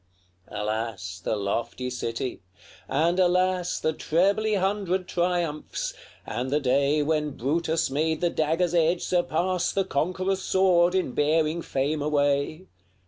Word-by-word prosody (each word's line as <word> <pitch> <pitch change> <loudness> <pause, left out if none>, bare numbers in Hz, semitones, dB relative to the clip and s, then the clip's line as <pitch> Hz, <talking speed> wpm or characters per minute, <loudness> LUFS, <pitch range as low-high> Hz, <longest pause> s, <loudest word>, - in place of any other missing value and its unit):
LXXXII. - - -6
Alas, 105 -4 -3
the - - 0
lofty 115 +5 -2
city! 120 -1 -4 0.5
and 165 +6 +1
alas 180 0 +2
The 155 - 0
trebly 200 +8 +1
hundred 190 -1 0
triumphs! 175 -4 -1 0.3
and 125 +2 -3
the 145 +2 +2
day 140 +2 +2
When 150 -1 -1
Brutus 160 +4 0
made 155 +3 0
the 175 -1 +1
dagger's 165 +3 0
edge 170 +1 +2
surpass 180 +1 0
The 195 -1 0
conqueror's 185 +6 -1
sword 185 -2 +3
in 185 -8 0
bearing 155 +4 +1
fame 145 +1 -1
away! 145 +3 0
160 Hz, 130 wpm, -26 LUFS, 140-180 Hz, 0.5 s, sword